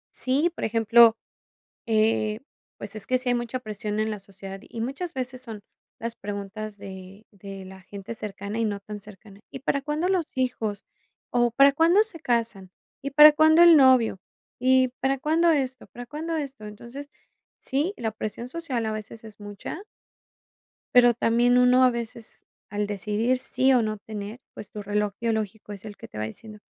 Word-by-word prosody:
Sí, 285 +7 +1
por - - -6
ejemplo, 225 0 +5 0.7
eh, 220 0 +1 0.4
pues - - -7
es 205 -2 -4
que 255 - +2
sí 250 0 -2
hay 245 - +3
mucha 240 +1 -3
presión 210 -2 -4
en 220 0 0
la 210 - -5
sociedad. 195 0 -10
Y 225 0 -8
muchas 285 +8 -4
veces 255 -1 -4
son 225 -5 -9 0.4
las 230 0 -5
preguntas 205 +1 -6
de 195 +1 -11
de 195 -1 -10
la 190 0 -12
gente 200 +4 -8
cercana 210 0 -6
y 225 - +1
no 205 -1 -2
tan 210 +1 -8
cercana. 200 0 -15
¿Y 270 - -8
para 280 +1 -1
cuándo 300 +5 -1
los 365 -4 +1
hijos? 225 -5 -2 0.5
O, 240 -1 +2
¿para 275 +3 +6
cuándo 335 +8 +4
se 395 -7 -8
casan? 225 -8 -1 0.3
¿Y 280 - -4
para 300 +2 +9
cuándo 315 +2 +6
el 340 -2 +9
novio? 255 -7 +5 0.4
¿Y 260 0 +4
para 270 0 +1
cuándo 320 +5 +2
esto? 260 -4 -1
¿Para 245 +1 -10
cuándo 315 +5 -4
esto? 275 -7 -5
Entonces, 235 +7 -9 0.5
sí, 295 +9 -1
la 220 -1 -2
presión 215 +2 -5
social 260 -5 -3
a 220 - -1
veces 215 +1 -7
es 215 -1 -13
mucha 205 - -7 1.1
pero 245 -1 +7
también 240 +2 +3
uno 250 +1 +5
a 255 - +6
veces 235 -1 -7 0.2
al 205 0 -2
decidir 210 +5 0
sí 260 0 +2
o 245 - +4
no 215 -1 -2
tener, 210 +2 -7
pues 210 - -10
tu 210 - -6
reloj 205 0 -1
biológico 220 -2 -3
es 200 +1 -11
el 205 -1 -9
que - - -10
te - - -12
va 110 - -2
diciendo: 210 - -10
230 Hz, 180 wpm, -25 LUFS, 210-260 Hz, 1.1 s, para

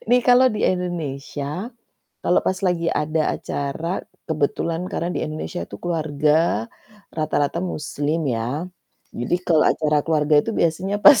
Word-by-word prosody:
Nih 250 +1 +6
kalau 250 +1 +6
di 215 - -3
Indonesia 160 - -3 0.5
kalau 175 - +4
pas 190 - 0
lagi 170 -2 +1
ada 155 0 0
acara 160 +6 -3 0.2
kebetulan 165 +3 -1
karena 175 0 -2
di - - -2
Indonesia 155 +3 -4
itu - - -8
keluarga 155 -6 +1 0.5
rata-rata 155 0 0
muslim 155 -2 -2
ya 125 +4 -1 0.5
jadi 120 +9 -1
kalau 160 -3 +4
acara 150 -1 +2
keluarga 150 -1 +2
itu - - -3
biasanya 180 +5 +1
pas 285 -7 +10
160 Hz, 135 wpm, -22 LUFS, 150-175 Hz, 0.5 s, pas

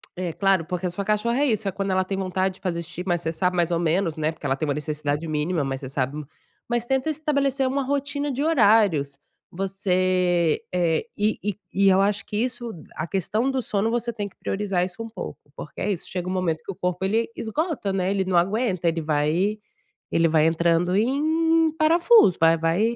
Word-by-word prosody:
eh, 180 -1 -3
claro, 195 -2 +2
porque 180 +1 -3
a - - +1
sua 200 +3 -4
cachorra 215 +5 0
é 290 - +3
isso, 215 -4 0
é - - 0
quando 195 +1 -3
ela 185 0 +2
tem 195 - -3
vontade 190 0 -1
de - - -19
fazer 170 -3 -2
xixi, 175 +2 -7
mas 175 -2 +1
você 160 - -2
sabe 180 +2 0
mais 175 -1 +1
ou 170 - +1
menos, 170 0 +1
né, 155 0 0
porque 160 - -12
ela 135 -1 +1
tem 155 +3 -3
uma 145 - +1
necessidade 150 +1 -2
mínima, 155 +1 -1
mas 135 -1 -3
você 130 - -6
sabe 135 +2 -2 0.5
mas 240 -1 0
tenta 265 +4 0
estabelecer 280 -3 0
uma 275 +1 0
rotina 285 +1 -2
de 270 +2 -2
horários, 205 - +3 0.3
você 185 -3 +1
eh, 170 -1 +1
e 210 +1 +1
e 205 -1 -3
e 195 0 +4
eu 190 0 +4
acho 205 +1 +1
que 210 - -4
isso, 240 0 -2 0.2
a 155 - -3
questão 215 +7 0
do 265 - -1
sono, 215 -1 -1
você 235 0 -1
tem 205 -2 -4
que - - -30
priorizar 195 -3 -1
isso 185 +4 -8
um 225 - -7
pouco, 215 -4 -7 0.2
porque 150 - -8
é 205 - 0
isso, 185 - -4
chega 180 -1 -4
um - - -2
momento 170 -4 -1
que - - -5
o - - -10
corpo 180 0 -2
ele 225 +4 +1
esgota, 275 - -2
né, 190 0 0
ele 195 -1 +1
não 185 -1 +1
aguenta, 190 0 +1
ele 165 0 +1
vai 155 +7 +1 0.5
ele 165 0 +3
vai 155 -1 +4
entrando 170 +2 +2
em 315 +8 +2
parafuso, 335 - +5
vai 165 0 +5
vai 185 +9 +1
190 Hz, 215 wpm, -24 LUFS, 170-230 Hz, 0.5 s, parafuso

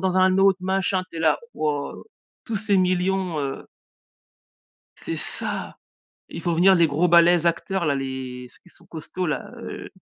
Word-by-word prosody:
dans 185 -1 0
un 185 0 +4
autre 195 -1 +4
machin, 190 0 0
tu 165 - -8
es - - -4
là, 155 -2 +3 0.2
«Waouh, 150 -2 -3 0.4
tous 225 -3 -3
ces 200 0 +1
millions», 185 -1 0
heu. 135 -1 -4 1.3
C'est - - -5
ça! - - -3 0.5
Il - - -7
font 170 - -1
venir 190 +3 +5
les 170 -2 +4
gros 160 +4 +1
balèzes 170 0 +5
acteurs 170 +1 0
là, 145 - +2
les 130 -2 -5
ceux - - -19
qui 180 - -20
sont - - -21
costauds-là, 160 0 -4
heu, - - -8
175 Hz, 170 wpm, -23 LUFS, 155-190 Hz, 1.3 s, venir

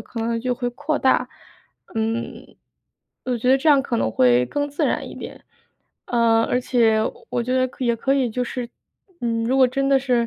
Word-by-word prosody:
可 230 - -7
能 230 0 -1
就 250 +1 -1
会 245 0 -3
扩 290 +5 -2
大， 265 - +2 0.7
嗯， 225 +1 -4 0.7
我 250 -1 0
觉 250 +3 +1
得 265 - +5
这 310 +4 +1
样 280 -2 +5
可 240 -4 -2
能 110 - 0
会 125 +1 +3
更 290 - -2
自 290 - 0
然 - - -1
一 - - -9
点。 - - -10 0.6
呃， 230 -1 +3
而 250 - 0
且 230 -3 +2 0.3
我 240 - -1
觉 250 - -3
得 255 0 +1
也 235 -1 +2
可 270 +4 0
以 260 -4 +1
就 250 +3 -2
是， 245 0 -4 0.5
嗯， 230 -1 -1
如 260 +3 +1
果 260 -1 +6
真 275 +2 -1
的 275 - +5
是 250 -3 +1
245 Hz, 215 characters per minute, -22 LUFS, 230-265 Hz, 0.7 s, 果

